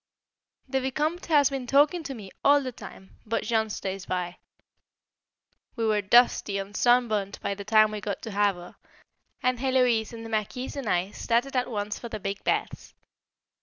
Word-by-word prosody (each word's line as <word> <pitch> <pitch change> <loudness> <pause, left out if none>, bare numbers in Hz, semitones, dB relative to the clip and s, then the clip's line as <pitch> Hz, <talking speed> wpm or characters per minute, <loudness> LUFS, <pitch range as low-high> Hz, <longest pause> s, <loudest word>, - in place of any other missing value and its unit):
The 265 0 0
Vicomte 300 +6 -2
has 290 -4 +4
been 265 -2 -4
talking 290 +6 +4
to 270 - -5
me 200 -5 -10
all 285 0 +5
the 255 - -4
time, 195 -4 -12
but 225 +1 -2
Jean 220 -2 0
stays 195 -2 -5
by. 180 -1 -3 1.4
We 230 -2 -1
were 215 -1 +2
dusty 210 -1 +4
and 195 +1 -6
sun 245 0 +4
burnt 205 -2 -2
by - - -1
the 200 0 -7
time 215 0 +5
we 210 -1 -5
got 200 0 -4
to 225 - -5
Havre, 200 -3 -1 0.7
and 250 -1 +1
Héloise 250 -4 +2
and 230 -1 -8
the - - -7
Marquise 220 +5 -3
and 270 -6 -4
I 180 +3 0
started 245 +5 -1
at 250 0 0
once 205 -2 -3
for 235 - -7
the 215 - -5
big 195 +1 -4
baths. - - -2
225 Hz, 180 wpm, -27 LUFS, 205-255 Hz, 1.4 s, all